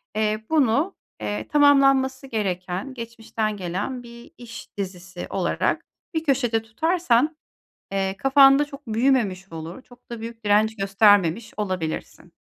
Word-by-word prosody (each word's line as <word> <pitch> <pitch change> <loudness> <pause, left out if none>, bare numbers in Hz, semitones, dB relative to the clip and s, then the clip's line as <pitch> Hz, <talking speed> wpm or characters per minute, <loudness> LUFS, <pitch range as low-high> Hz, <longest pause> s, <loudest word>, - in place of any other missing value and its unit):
eee, 215 0 0
bunu, 300 - +2 0.3
eee, 105 +1 -3
tamamlanması 275 -2 +4
gereken, 190 0 -3
geçmişten 225 -3 -4
gelen 195 +8 -4
bir 235 0 -13
iş 230 -3 -11
dizisi." 185 -2 -6
olarak - - -1 0.3
bir 320 -1 -1
köşede 245 -6 +1
tutarsan, 305 +3 +1 0.6
eee, 195 0 -1
kafanda 275 +2 +6
çok 285 -2 -12
büyümemiş 220 -6 +1
olur. 165 +7 -7
Çok 245 -1 -21
da 235 -1 -6
büyük 230 0 -8
direnç 215 +1 +3
göstermemiş 205 0 +3
olabilirsin. 185 -6 -4
225 Hz, 120 wpm, -23 LUFS, 195-265 Hz, 0.6 s, kafanda